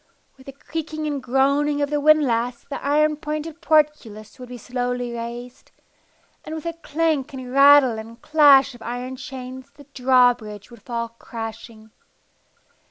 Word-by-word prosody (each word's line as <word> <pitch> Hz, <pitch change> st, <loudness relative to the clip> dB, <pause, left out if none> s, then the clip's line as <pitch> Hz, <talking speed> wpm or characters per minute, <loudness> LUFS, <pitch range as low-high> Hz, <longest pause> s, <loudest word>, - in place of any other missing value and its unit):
With 265 Hz, 0 st, -19 dB
the -, -, -7 dB
creaking 310 Hz, +2 st, -6 dB
and 290 Hz, -2 st, -3 dB
groaning 280 Hz, +3 st, +1 dB
of 285 Hz, 0 st, -1 dB
the 295 Hz, -, +1 dB
windlass 255 Hz, -6 st, +2 dB
the 280 Hz, -, -7 dB
iron 300 Hz, +1 st, +2 dB
pointed 305 Hz, +2 st, -6 dB
portcullis 275 Hz, -9 st, 0 dB
would 250 Hz, -1 st, -10 dB
be 250 Hz, -, -8 dB
slowly 245 Hz, 0 st, -3 dB
raised, 240 Hz, +2 st, -8 dB, 0.7 s
and 310 Hz, -, -7 dB
with 315 Hz, -, -8 dB
a 335 Hz, -, -3 dB
clank 320 Hz, -3 st, -2 dB
and 255 Hz, -1 st, -8 dB
rattle 275 Hz, -4 st, +6 dB
and 230 Hz, +1 st, -11 dB
clash 285 Hz, -3 st, +5 dB
of 240 Hz, -, -15 dB
iron 245 Hz, +3 st, -5 dB
chains 260 Hz, 0 st, -9 dB
the 285 Hz, +1 st, -17 dB
drawbridge 245 Hz, -5 st, +1 dB
would 235 Hz, -3 st, -14 dB
fall 235 Hz, 0 st, -4 dB
crashing. 225 Hz, -1 st, -9 dB
260 Hz, 150 wpm, -22 LUFS, 240-295 Hz, 0.7 s, rattle